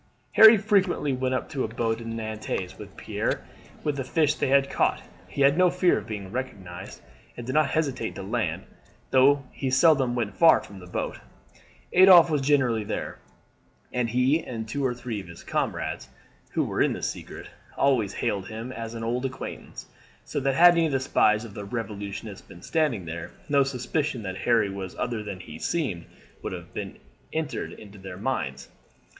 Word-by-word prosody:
Harry 220 Hz, 0 st, +9 dB
frequently 195 Hz, -8 st, +1 dB
went 130 Hz, 0 st, 0 dB
up 130 Hz, -, -4 dB
in 135 Hz, -, -2 dB
a -, -, 0 dB
boat 115 Hz, 0 st, -1 dB
to 115 Hz, -, -8 dB
Nantes 110 Hz, -4 st, -4 dB
with -, -, -11 dB
Pierre -, -, -2 dB, 0.4 s
with 150 Hz, -2 st, -1 dB
the 135 Hz, -, -2 dB
fish 150 Hz, +2 st, +2 dB
they -, -, -1 dB
had 135 Hz, 0 st, +4 dB
caught. -, -, 0 dB, 0.2 s
He 140 Hz, -, -4 dB
had 140 Hz, +4 st, +5 dB
no 180 Hz, -1 st, +6 dB
fear 180 Hz, 0 st, +2 dB
of -, -, -11 dB
being 100 Hz, -3 st, -6 dB
recognized, 95 Hz, -8 st, -6 dB, 0.4 s
and 120 Hz, -, -6 dB
did 130 Hz, -, -3 dB
not 155 Hz, +1 st, +3 dB
hesitate 135 Hz, -8 st, -1 dB
to 95 Hz, -, -6 dB
land, 110 Hz, +3 st, -2 dB, 0.5 s
though 135 Hz, +2 st, +5 dB
he 135 Hz, -, -3 dB
seldom 135 Hz, -2 st, +4 dB
went 110 Hz, -5 st, -2 dB
far 165 Hz, -1 st, +6 dB
from 100 Hz, -2 st, -11 dB
the 90 Hz, -, -12 dB
boat. 90 Hz, -, -4 dB, 0.7 s
Adolphe 180 Hz, -3 st, +8 dB
was 150 Hz, -2 st, +1 dB
generally 130 Hz, -6 st, +2 dB
there, 105 Hz, -, -4 dB, 0.7 s
and 125 Hz, -2 st, 0 dB
he 130 Hz, +7 st, +2 dB
and 110 Hz, -3 st, -5 dB
two 140 Hz, +6 st, -3 dB
or 125 Hz, -2 st, 0 dB
three 120 Hz, -3 st, -5 dB
of 95 Hz, -, -13 dB
his 85 Hz, 0 st, -11 dB
comrades, 65 Hz, -, -2 dB, 0.4 s
who -, -, +2 dB
were -, -, -1 dB
in -, -, +3 dB
the -, -, -7 dB
secret, -, -, -5 dB, 0.3 s
always 125 Hz, -8 st, +2 dB
hailed 100 Hz, -2 st, -2 dB
him 115 Hz, +3 st, -6 dB
as 115 Hz, -2 st, -6 dB
an 115 Hz, -, -5 dB
old 120 Hz, +3 st, -1 dB
acquaintance, 130 Hz, -2 st, -6 dB, 0.4 s
so -, -, -2 dB
that 135 Hz, -1 st, 0 dB
had 175 Hz, +3 st, +8 dB
any 170 Hz, -1 st, +2 dB
of 150 Hz, -, -3 dB
the 135 Hz, -, +2 dB
spies 110 Hz, -4 st, +2 dB
of 110 Hz, -, -10 dB
the 105 Hz, -, -6 dB
Revolutionists 100 Hz, -1 st, -6 dB
been 85 Hz, -, -13 dB
standing 145 Hz, -, 0 dB
there, 85 Hz, +1 st, -6 dB, 0.2 s
no 140 Hz, -1 st, +4 dB
suspicion 135 Hz, 0 st, -1 dB
that 95 Hz, -1 st, -4 dB
Harry 115 Hz, -4 st, +2 dB
was 95 Hz, -1 st, -6 dB
other 120 Hz, -3 st, -2 dB
than 100 Hz, -3 st, -6 dB
he 80 Hz, -4 st, -10 dB
seemed 125 Hz, -, -2 dB, 0.4 s
would -, -, -4 dB
have -, -, -8 dB, 0.6 s
entered 145 Hz, -9 st, -4 dB
their 95 Hz, -2 st, -8 dB
minds. 95 Hz, -, -3 dB
125 Hz, 185 wpm, -26 LUFS, 105-140 Hz, 0.7 s, Harry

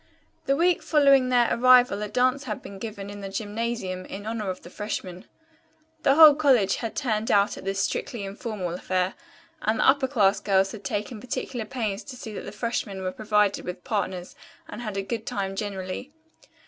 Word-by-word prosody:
The 275 Hz, -, +3 dB
week 345 Hz, +3 st, +2 dB
following 275 Hz, -4 st, +4 dB
their 245 Hz, -2 st, +4 dB
arrival 250 Hz, -4 st, +5 dB
a 210 Hz, -, -2 dB
dance 255 Hz, +5 st, +1 dB
had 215 Hz, -4 st, -5 dB
been 195 Hz, -1 st, -9 dB
given 200 Hz, -2 st, -6 dB
in 205 Hz, 0 st, -8 dB
the 195 Hz, -, -5 dB
gymnasium 205 Hz, -2 st, -3 dB
in 205 Hz, +1 st, -8 dB
honor 220 Hz, -3 st, -3 dB
of 185 Hz, -, -5 dB
the 175 Hz, -, -12 dB
freshmen. 185 Hz, -3 st, -5 dB, 0.8 s
The 270 Hz, -, +4 dB
whole 310 Hz, -1 st, +10 dB
college 270 Hz, -9 st, +3 dB
had 230 Hz, -2 st, -5 dB
turned 225 Hz, -5 st, -1 dB
out 200 Hz, 0 st, +3 dB
at -, -, -10 dB
this 195 Hz, 0 st, -1 dB
strictly 220 Hz, +3 st, -2 dB
informal 195 Hz, -3 st, -4 dB
affair, 185 Hz, +1 st, -1 dB, 0.5 s
and 220 Hz, +1 st, +1 dB
the -, -, +3 dB
upper 265 Hz, 0 st, +4 dB
class 210 Hz, -7 st, +3 dB
girls 195 Hz, -1 st, +2 dB
had 210 Hz, -2 st, -9 dB
taken 210 Hz, +3 st, -3 dB
particular 250 Hz, -1 st, -4 dB
pains 220 Hz, -4 st, -3 dB
to 260 Hz, -, -8 dB
see 225 Hz, -3 st, -8 dB
that -, -, -6 dB
the -, -, -6 dB
freshmen 210 Hz, -5 st, -3 dB
were 185 Hz, -, -1 dB
provided 210 Hz, -1 st, +1 dB
with 180 Hz, 0 st, -6 dB
partners 190 Hz, -6 st, -3 dB, 0.3 s
and -, -, -8 dB
had 215 Hz, -4 st, -4 dB
a 195 Hz, -, -1 dB
good 225 Hz, +2 st, -4 dB
time 195 Hz, -1 st, -2 dB
generally. 195 Hz, +5 st, -5 dB
210 Hz, 190 wpm, -26 LUFS, 195-245 Hz, 0.8 s, whole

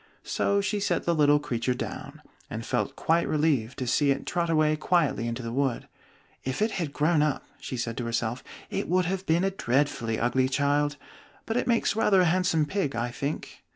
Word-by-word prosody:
So 200 Hz, 0 st, +1 dB
she 205 Hz, +1 st, -1 dB
set 185 Hz, -4 st, 0 dB
the 170 Hz, -, +2 dB
little 150 Hz, -2 st, +5 dB
creature 125 Hz, -4 st, -1 dB
down, -, -, -7 dB, 0.3 s
and -, -, -5 dB
felt -, -, -1 dB
quite 165 Hz, +1 st, +1 dB
relieved 145 Hz, -7 st, +1 dB
to 130 Hz, -, -3 dB
see 140 Hz, +4 st, +2 dB
it 140 Hz, 0 st, 0 dB
trot 170 Hz, -1 st, -1 dB
away 155 Hz, -1 st, +3 dB
quietly 150 Hz, -, +1 dB
into 115 Hz, +2 st, -4 dB
the 115 Hz, -, -4 dB
wood. 135 Hz, -1 st, -1 dB, 0.6 s
"If 130 Hz, -, -3 dB
it 215 Hz, +2 st, +1 dB
had 170 Hz, -8 st, -3 dB
grown 150 Hz, +2 st, +2 dB
up," 150 Hz, -2 st, 0 dB
she 130 Hz, -, -5 dB
said 115 Hz, -1 st, -3 dB
to 120 Hz, -, -2 dB
herself, 115 Hz, +1 st, -2 dB, 0.3 s
"it -, -, -2 dB
would 180 Hz, +1 st, +3 dB
have 190 Hz, +2 st, -3 dB
been 165 Hz, +3 st, +3 dB
a 195 Hz, -, +1 dB
dreadfully 125 Hz, -, 0 dB
ugly 130 Hz, +2 st, +2 dB
child: 145 Hz, +1 st, +1 dB, 0.5 s
but 225 Hz, -, -2 dB
it 245 Hz, -, 0 dB
makes 230 Hz, -3 st, +2 dB
rather 205 Hz, -3 st, +4 dB
a -, -, +4 dB
handsome 175 Hz, -2 st, +2 dB
pig, 150 Hz, -, -2 dB
I 120 Hz, +1 st, -2 dB
think." 140 Hz, +4 st, -5 dB
150 Hz, 200 wpm, -27 LUFS, 130-175 Hz, 0.6 s, little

